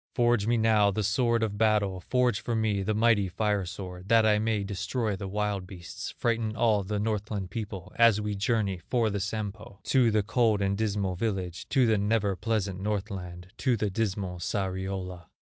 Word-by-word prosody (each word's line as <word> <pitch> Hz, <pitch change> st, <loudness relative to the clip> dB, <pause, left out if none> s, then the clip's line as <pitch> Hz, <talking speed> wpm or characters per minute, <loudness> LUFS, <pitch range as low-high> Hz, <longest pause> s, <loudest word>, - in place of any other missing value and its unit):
Forge 120 Hz, -4 st, +2 dB
me 120 Hz, 0 st, +3 dB
now 110 Hz, -2 st, +4 dB
the 105 Hz, +2 st, -1 dB
sword 115 Hz, +2 st, +2 dB
of 105 Hz, -2 st, -2 dB
battle, 105 Hz, -4 st, +2 dB
Forge 125 Hz, +2 st, +1 dB
for 120 Hz, -, -2 dB
me 110 Hz, -3 st, +1 dB
the 105 Hz, +2 st, -1 dB
mighty 110 Hz, -3 st, +3 dB
fire 105 Hz, -1 st, 0 dB
sword, 90 Hz, 0 st, -8 dB
That 115 Hz, -1 st, +5 dB
I 105 Hz, -1 st, +4 dB
may 110 Hz, -2 st, 0 dB
destroy 105 Hz, +2 st, -2 dB
the 95 Hz, +1 st, -6 dB
wild 100 Hz, -1 st, -2 dB
beasts, 90 Hz, -3 st, -7 dB
Frighten 115 Hz, -2 st, 0 dB
all 110 Hz, -4 st, +3 dB
the 105 Hz, +2 st, -3 dB
Northland 105 Hz, -3 st, -2 dB
people, 105 Hz, -3 st, -6 dB
As 115 Hz, -3 st, +5 dB
we 105 Hz, 0 st, -2 dB
journey 100 Hz, -2 st, 0 dB
for 115 Hz, -4 st, +2 dB
the 100 Hz, -, -2 dB
Sampo 105 Hz, 0 st, -5 dB
To 130 Hz, -4 st, +3 dB
the 110 Hz, -1 st, +2 dB
cold 115 Hz, -1 st, +2 dB
and 100 Hz, 0 st, 0 dB
dismal 100 Hz, -3 st, -1 dB
village, 95 Hz, -3 st, -3 dB
To 135 Hz, -3 st, +3 dB
the 110 Hz, -3 st, +3 dB
never 105 Hz, -1 st, +1 dB
pleasant 100 Hz, -2 st, -2 dB
Northland, 95 Hz, -3 st, -4 dB
To 125 Hz, -4 st, +1 dB
the 105 Hz, -1 st, -1 dB
dismal 95 Hz, -3 st, -2 dB
Sariola." 95 Hz, -1 st, -3 dB
105 Hz, 180 wpm, -28 LUFS, 95-110 Hz, -, That